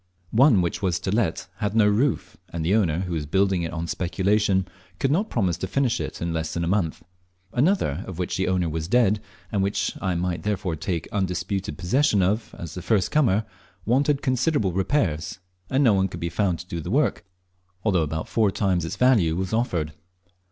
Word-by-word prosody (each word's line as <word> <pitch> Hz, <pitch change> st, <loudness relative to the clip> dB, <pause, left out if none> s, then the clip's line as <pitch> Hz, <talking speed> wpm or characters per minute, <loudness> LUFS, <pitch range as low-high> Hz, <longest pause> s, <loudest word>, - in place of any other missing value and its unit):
One 115 Hz, -5 st, +5 dB
which 85 Hz, -, -2 dB
was 90 Hz, -3 st, 0 dB
to 95 Hz, -, -2 dB
let 105 Hz, -7 st, 0 dB
had 105 Hz, 0 st, -2 dB
no 110 Hz, -2 st, +5 dB
roof; 110 Hz, 0 st, +1 dB
and 85 Hz, -2 st, -4 dB
the 90 Hz, -, +2 dB
owner, 90 Hz, -6 st, +2 dB
who 90 Hz, -2 st, -3 dB
was 75 Hz, -3 st, -3 dB
building 95 Hz, +2 st, +2 dB
it 80 Hz, -, -3 dB
on 85 Hz, 0 st, -3 dB
speculation, 95 Hz, +3 st, +1 dB, 0.3 s
could 135 Hz, -, +1 dB
not 195 Hz, +8 st, +1 dB
promise 95 Hz, -8 st, 0 dB
to 95 Hz, -, -3 dB
finish 130 Hz, +3 st, 0 dB
it -, -, -5 dB
in 85 Hz, 0 st, -2 dB
less 80 Hz, -1 st, -3 dB
than 85 Hz, -, -1 dB
a -, -, -1 dB
month. 90 Hz, -4 st, 0 dB, 0.5 s
Another, 120 Hz, -, +1 dB
of 95 Hz, -, -7 dB
which 90 Hz, -, -2 dB
the 95 Hz, -, 0 dB
owner 90 Hz, -2 st, +1 dB
was 80 Hz, 0 st, -3 dB
dead, 110 Hz, -1 st, +3 dB, 0.3 s
and 100 Hz, -, +1 dB
which 100 Hz, -1 st, -1 dB
I 95 Hz, -3 st, 0 dB
might 90 Hz, +1 st, -1 dB
therefore 100 Hz, -5 st, -2 dB
take 85 Hz, +1 st, -3 dB
undisputed 95 Hz, -3 st, -2 dB
possession 100 Hz, +3 st, +2 dB
of 105 Hz, +4 st, -1 dB
as 85 Hz, -2 st, -7 dB
the 90 Hz, -, -6 dB
first 95 Hz, -, +1 dB
comer, 115 Hz, -9 st, +3 dB, 0.4 s
wanted 140 Hz, +4 st, +2 dB
considerable 130 Hz, -, +1 dB
repairs, 95 Hz, -, 0 dB, 0.3 s
and 135 Hz, +2 st, +2 dB
no 115 Hz, -5 st, +5 dB
one 95 Hz, -1 st, +2 dB
could 85 Hz, -2 st, -8 dB
be 85 Hz, 0 st, -2 dB
found 90 Hz, -1 st, 0 dB
to 90 Hz, -, -10 dB
do 85 Hz, -, -4 dB
the 85 Hz, -, -6 dB
work, 145 Hz, +8 st, +1 dB, 0.6 s
although 95 Hz, -6 st, +2 dB
about 80 Hz, +1 st, -3 dB
four 110 Hz, -3 st, +2 dB
times 95 Hz, -4 st, 0 dB
its 80 Hz, -, -4 dB
value 105 Hz, -10 st, +3 dB
was 95 Hz, +3 st, -3 dB
offered. 85 Hz, -10 st, 0 dB
95 Hz, 200 wpm, -24 LUFS, 85-110 Hz, 0.6 s, One